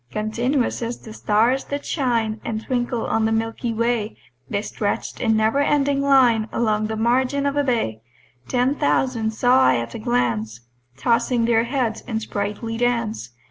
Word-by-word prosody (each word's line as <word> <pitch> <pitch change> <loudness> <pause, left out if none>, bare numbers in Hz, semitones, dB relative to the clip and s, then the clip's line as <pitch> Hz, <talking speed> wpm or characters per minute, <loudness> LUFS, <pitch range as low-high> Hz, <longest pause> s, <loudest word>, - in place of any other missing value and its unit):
Continuous 235 - -1
as 235 +1 -3
the 220 - -11
stars 230 +6 +1
that 285 0 -5
shine 230 -6 -1
And 220 -1 -4
twinkle 240 -2 -1
on 225 0 +1
the 220 - +1
milky 225 +1 -1
way, 230 -1 -1 0.3
They 200 0 -1
stretch'd 205 -1 -3
in 225 -2 +2
never 220 +5 +2
ending 285 -1 +2
line 250 -6 +4
Along 215 -2 0
the 220 - -3
margin 255 +5 +1
of 280 0 0
a 290 - +2
bay: 225 - -1 0.5
Ten 250 +2 +1
thousand 225 - 0
saw 245 +4 +3
I 130 - +5
at 115 -1 -3
a - - -6
glance 115 -1 -1 0.4
Tossing 235 - +1
their 230 0 +3
heads 240 -3 -1
in 225 -3 -3
sprightly 210 +2 -4
dance. 230 - -1
230 Hz, 165 wpm, -22 LUFS, 215-250 Hz, 0.5 s, I